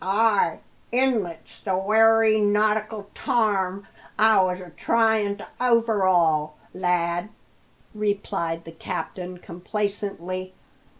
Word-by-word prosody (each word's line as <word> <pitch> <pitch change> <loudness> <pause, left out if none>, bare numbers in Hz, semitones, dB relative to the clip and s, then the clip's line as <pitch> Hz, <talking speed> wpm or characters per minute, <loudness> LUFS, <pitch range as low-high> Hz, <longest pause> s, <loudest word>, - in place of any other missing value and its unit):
"Ay, 205 -2 +2 0.3
inlet's 230 -10 -1
the 190 -2 -1
wery 220 +2 +4
nautical 210 0 +1
tarm 200 -6 0 0.3
I 220 -2 +5
was 185 -1 0
a 180 -2 -11
tryin' 220 +1 +1
to 205 - -10
overhaul, 185 -11 +2 0.2
lad," 175 +1 -1 0.6
replied 200 -5 -2
the 165 - -10
captain 180 +2 -6
complacently. 185 0 -4
200 Hz, 95 wpm, -24 LUFS, 180-220 Hz, 0.6 s, I